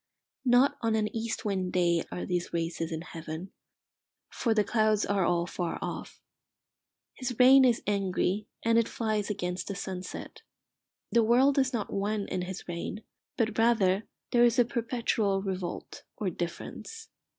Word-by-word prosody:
Not 250 +2 +4
on 225 -1 +1
an 215 0 -1
east 225 0 -3
wind 190 -3 -1
day 170 -2 +2
are 180 - -4
these 175 -1 -2
races 165 0 -2
in 160 -1 -3
heaven, 165 +1 -7 0.8
for 230 -3 0
the 210 - +4
clouds 215 0 +2
are 200 -1 +1
all 170 0 +2
far 175 -1 -3
off. - - -6 0.9
His 255 -1 -4
rain 265 +1 +8
is 245 -3 +3
angry, 200 0 0 0.2
and 230 0 +4
it 230 - 0
flies 215 -3 -1
against 180 -3 -3
the 200 - -3
sunset. 185 -1 -6 0.7
The 235 - +5
world 255 +5 +4
is 265 -1 +2
not 230 -5 -3
one 205 +1 -1
in 185 - -1
his 185 +1 -6
reign, 175 +5 -5 0.3
but 225 -1 0
rather 215 -4 +3 0.3
there 240 -1 +5
is 235 -1 +4
a 245 - +5
perpetual 230 -5 0
revolt 185 -3 -4 0.2
or 195 -4 -1
difference. 450 - -6
205 Hz, 155 wpm, -29 LUFS, 180-230 Hz, 0.9 s, rain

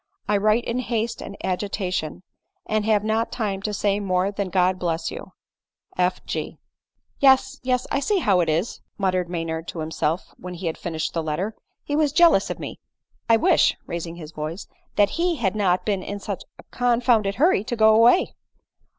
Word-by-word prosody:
I 210 - +2
write 215 +3 +2
in 235 +2 -2
haste 230 -2 -2
and 200 - -8
agitation, 185 -3 -2 0.4
and 215 -1 0
have 215 -2 +3
not 220 +1 0
time 205 -5 -2
to 210 - -2
say 205 0 0
more 190 -1 0
than 200 -1 -3
God 185 0 +2
bless 165 -2 -2
you! - - -9 0.6
F. 180 0 0
G." - - -4 0.3
" - - -69 0.3
Yes, 265 -1 +4
yes, 255 0 0
I - - +2
see 410 +8 +1
how 200 - +3
it 170 -2 +1
is," 165 +8 -1 0.2
muttered 185 -3 0
Mr - - -18
Maynard 165 -1 -3
to 170 - -6
himself 160 +1 -2
when 180 0 -7
he 175 +2 -7
had 165 - -1
finished 160 -2 -3
the 165 - -1
letter, 175 +8 -3 0.2
" - - -53
he 290 - -2
was 300 -2 +2
jealous 340 +2 +5
of - - -3
me. - - -7 0.5
1 230 -1 +4
wish, 370 - +4
(raising 170 0 -5
his 160 -3 -9
voice) 155 +4 -5 0.3
that 205 0 +4
he 350 -1 +2
had 215 -8 -1
not 185 -3 +1
been 200 -3 0
in 205 +2 -5
such 200 -1 -5
a - - -14
confounded 235 -4 +2
hurry 305 - +3
to 240 - -3
go 220 -1 +5
away." 235 +11 +5
200 Hz, 195 wpm, -23 LUFS, 180-230 Hz, 0.6 s, jealous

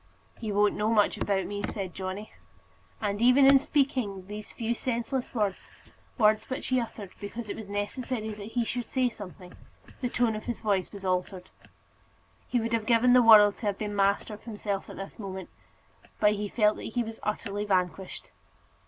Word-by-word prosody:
"He 220 -2 -3
won't 205 0 +3
know 210 +1 0
much 210 -2 +3
about 195 -2 0
me," 205 0 -4
said 195 -4 -4
Johnny; 190 +3 -5 0.7
and 205 0 -1
even 250 +3 +6
in 275 0 +8
speaking 255 -10 0
these 210 +1 -8
few 230 0 -2
senseless 245 +2 -3
words 205 -4 -1 0.5
words 215 -2 +3
which 260 - -4
he 255 -1 +3
uttered 215 -5 -6
because 215 +2 -6
it - - -3
was 215 -2 -8
necessary 220 +3 -3
that 210 +1 -9
he 240 -2 +1
should 245 +1 -3
say 255 -2 +2
something 185 -4 -11 0.5
the 250 - 0
tone 235 -2 +1
of 215 - -6
his 240 - -4
voice 200 -4 0
was 200 -2 -9
altered. 185 0 -2 1.0
He 245 - +1
would 230 0 -2
have 225 -2 0
given 245 +1 +5
the 250 - +7
world 210 -3 +8
to 220 - -4
have 200 -1 0
been 210 -1 -4
master 200 +2 +1
of 210 - -11
himself 205 -3 -4
at - - -9
this 195 +4 -8
moment, 190 -3 -6 0.7
but 210 0 +5
he 205 0 -3
felt 210 -1 +3
that 225 - -7
he 240 - +2
was 225 0 -8
utterly 205 -1 -2
vanquished. 185 -2 -2
210 Hz, 190 wpm, -28 LUFS, 200-235 Hz, 1.0 s, in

